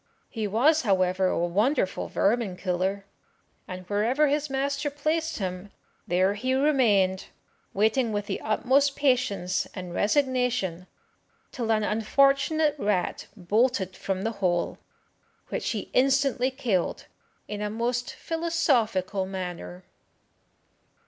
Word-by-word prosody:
He 220 -3 -2
was, 280 +10 +3
however, 185 -3 +2
a - - 0
wonderful 195 - 0
vermin 205 -3 0
killer, 190 +2 -2 0.6
and 185 0 -7
wherever 235 +9 +2
his 295 +1 0
master 280 +2 -1
placed 315 +3 -1
him, 185 0 -5 0.4
there 185 +3 +2
he 255 +5 -1
remained, 225 -10 +2 0.5
waiting 220 +4 +1
with 205 -1 -2
the - - -4
utmost 265 +6 +2
patience 245 -10 +1
and 180 -3 -6
resignation 245 - 0 0.6
till 230 -3 -2
an 215 -1 +2
unfortunate 275 +8 +2
rat 200 -5 -1
bolted 200 0 +1
from 190 0 -3
the 225 - 0
hole, 175 -2 0 0.7
which - - -2
he 215 -4 -4
instantly 270 -1 +2
killed 245 -9 -1 0.4
in 210 0 -5
a 210 - -1
most 240 +3 -2
philosophical 245 - 0
manner. 175 - -6
220 Hz, 115 wpm, -26 LUFS, 190-270 Hz, 0.7 s, was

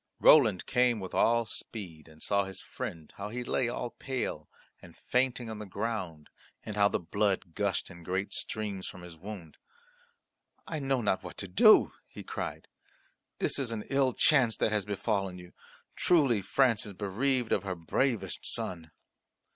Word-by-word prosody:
Roland 110 - +6
came 125 -3 +2
with 95 -2 -7
all 115 0 +3
speed, 90 -8 -8
and 80 0 -13
saw 100 0 +2
his 95 -1 -6
friend, 90 -12 -7
how 100 +1 -5
he 125 +3 -4
lay 120 0 0
all 120 0 -3
pale 130 -1 -4 0.3
and - - -14
fainting 125 -1 0
on 110 -1 -6
the 105 - -6
ground 95 -7 -4 0.3
and 105 - -6
how 100 -1 +5
the - - 0
blood 95 -1 -1
gushed 100 0 -1
in 85 -1 -12
great 95 +4 -2
streams 105 -3 -3
from 90 - -9
his 90 -1 -10
wound. 90 -2 -9 1.1
"I 160 - -4
know 135 -2 0
not 100 -2 +1
what - - -9
to 100 - -4
do," 90 - +6
he - - -10
cried. - - -5 0.7
"This - - 0
is 130 -4 -1
an 110 -2 -3
ill 135 -2 +3
chance 130 -6 +4
that - - +1
has 105 -2 0
befallen 100 -2 -1
you. 90 0 -12 0.4
Truly 140 - +3
France 120 +4 +2
is 105 - -7
bereaved 115 +6 0
of - - +3
her 95 -1 -3
bravest 95 +3 -1
son." 85 -3 -3
105 Hz, 170 wpm, -30 LUFS, 95-120 Hz, 1.1 s, Roland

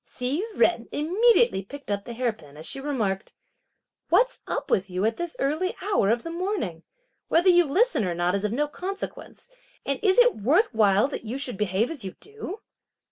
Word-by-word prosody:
Hsi 265 +9 -2
Jen 240 -9 +2
immediately 400 - +3
picked 275 +4 -9
up 200 0 -2
the 240 - -6
hair 240 -1 0
pin, 150 -8 -16
as 155 - -7
she 270 - -4
remarked: 220 -9 -2 0.7
"What's 485 +8 +3
up - - -3
with 190 0 +1
you 185 +2 -1
at 225 0 0
this 345 -1 -4
early 310 +7 -1
hour 390 - +1
of 230 +1 +1
the 330 - -5
morning? 340 - -3 0.5
Whether 350 +3 +4
you 350 -1 +6
listen 390 - +2
or 175 -2 -2
not 175 +1 +1
is 200 0 -1
of 210 - 0
no 295 +6 0
consequence; 385 +10 -7 0.4
and 275 -1 -1
is 390 -3 +3
it - - +6
worth 300 - +2
while 210 +1 +4
that 270 - -6
you 235 +5 -4
should 260 -4 -2
behave 210 - 0
as 290 -9 -7
you 190 - -6
do?" 425 -1 -8
270 Hz, 195 wpm, -25 LUFS, -, 0.7 s, you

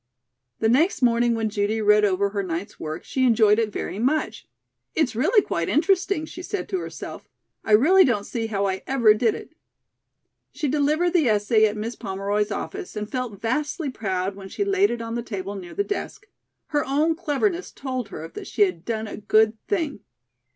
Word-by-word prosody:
The 220 - +2
next 280 - +2
morning 235 0 +3
when 220 -1 -1
Judy 205 +1 0
read 210 0 +4
over 200 0 +2
her 200 0 -2
night's 185 +2 -5
work, 155 +2 -5
she 260 - -1
enjoyed 220 -3 +5
it 220 -2 0
very 200 - -4
much. 285 +7 -1 0.5
"It's 310 -8 +1
really 405 - +3
quite 170 -1 -2
interesting," 370 +1 +2
she 360 - -9
said 405 +2 -4
to 380 - -1
herself. - - -8 0.3
"I 215 - 0
really 345 - +7
don't 215 - +1
see 225 +1 -3
how 200 -2 -1
I 190 -1 -1
ever 240 -5 +5
did 220 0 +1
it." - - -10 1.0
She 295 +1 -2
delivered 300 +5 +2
the 325 -8 +3
essay 215 +1 +3
at 210 0 -4
Miss 225 +3 -4
Pomeroy's 200 0 -2
office 390 - -5
and 210 0 -5
felt 250 -6 -4
vastly 295 +5 -1
proud 190 -4 -2
when 195 -1 -10
she 405 - -2
laid 395 0 +3
it 235 -1 -3
on 230 0 -5
the 235 - -2
table 200 -4 -5
near 185 -3 -8
the 405 - +1
desk. 405 0 -5 0.4
Her 295 -2 +1
own 295 +4 +1
cleverness 345 +3 -1
told 255 -4 -4
her 160 -4 -7
that - - -9
she 210 - +3
had 180 -4 -1
done 220 -1 -3
a - - -7
good 215 +1 +3
thing. 325 - -1
230 Hz, 195 wpm, -24 LUFS, 205-300 Hz, 1.0 s, really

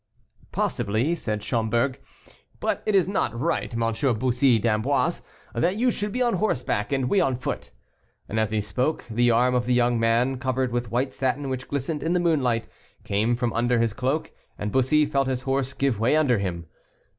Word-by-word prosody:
"Possibly," 110 +11 0
said 110 -10 -3
Schomberg; 120 +3 0 0.6
"but - - -1
it 215 - +2
is 190 -2 +4
not 120 - -1
right, 120 -9 -1
M. 115 +2 0
Bussy 125 +1 +3
d'Amboise, 110 -1 +1 0.3
that 170 +11 +1
you 245 +3 +2
should 205 -2 -3
be 250 +4 0
on 240 -1 +1
horseback 125 - -1
and 135 -2 +1
we 195 - +3
on 130 - +1
foot." 125 - -4 0.6
And 110 - -2
as 110 -1 +1
he 110 -1 0
spoke, 130 +8 -1
the 120 +2 +3
arm 125 +2 +3
of 125 -1 0
the 125 - +3
young 120 -1 +2
man, 120 +3 +2
covered 130 -1 -1
with 120 -1 -2
white 130 +3 -1
satin, 135 +1 -1
which 125 -1 -4
glistened 145 +2 -3
in 165 - 0
the 180 - +2
moonlight, 135 -9 +1 0.4
came 110 +4 +1
from 120 -1 -1
under 120 +1 +1
his 115 -2 +1
cloak, 130 +6 -1 0.3
and 105 0 -3
Bussy 135 +5 +3
felt 140 -2 0
his 130 -1 -2
horse 135 -1 -1
give 135 -6 0
way 120 +6 +3
under 135 -8 +3
him. 85 -3 -3
125 Hz, 190 wpm, -25 LUFS, 115-140 Hz, 0.6 s, is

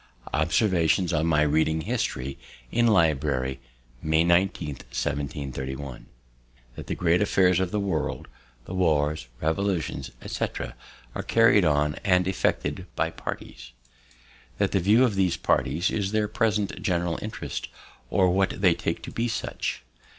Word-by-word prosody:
Observations 85 +2 +2
on 80 0 +1
my 75 -2 +3
reading 80 +1 +2
history, 70 -2 -3 0.3
in 120 0 +3
Library, 70 - +2 0.4
May 80 +1 +3
19th, 85 -5 +1
1731. 65 -2 -4 0.7
"That - - -8
the - - -2
great 85 0 +2
affairs 95 -3 +3
of 95 -1 0
the 105 - -1
world, 100 -2 -2 0.4
the 90 - -7
wars, 80 -6 +1
revolutions, 80 -5 -1
etc., - - -3 0.4
are - - -3
carried 115 -4 +4
on 75 -1 +2
and 90 -2 +3
effected 95 - -1
by - - 0
parties. - - -7 0.8
"That - - +1
the 95 - +2
view 105 +7 +5
of 120 -5 +2
these 95 -3 +1
parties 80 +7 +1
is 100 -2 -1
their 110 -1 +2
present 105 -3 0
general 85 -4 0
interest, 110 - -5 0.4
or 95 +2 +3
what 95 +2 +1
they 95 -3 +5
take - - -3
to - - -7
be 115 +1 -1
such. 110 - -3
85 Hz, 135 wpm, -26 LUFS, 75-100 Hz, 0.8 s, view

